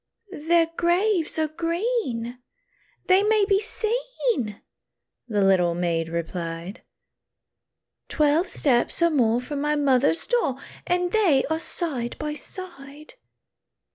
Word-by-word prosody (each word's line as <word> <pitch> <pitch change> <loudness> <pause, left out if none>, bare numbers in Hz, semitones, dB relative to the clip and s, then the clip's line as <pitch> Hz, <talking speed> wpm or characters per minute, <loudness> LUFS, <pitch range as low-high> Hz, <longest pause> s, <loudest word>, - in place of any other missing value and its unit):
"Their 340 0 +5
graves 350 0 +1
are 315 -1 +1
green, 330 - -2 0.6
they 375 +1 +5
may 425 0 +3
be 395 -1 +3
seen," 445 - -2 0.7
The 210 -4 +1
little 180 -3 +3
maid 165 -2 -1
replied, 170 +3 -5 1.3
"Twelve 305 +4 +2
steps 270 +1 +1
or 340 - +4
more 240 -5 +2
from 280 +3 -5
my 300 +1 +1
mother's 285 +1 +2
door, 470 - +1 0.3
And 355 0 0
they 355 -12 +3
are 320 - 0
side 275 -9 -3
by 300 0 -3
side. 305 - -9
300 Hz, 110 wpm, -24 LUFS, 240-360 Hz, 1.3 s, Their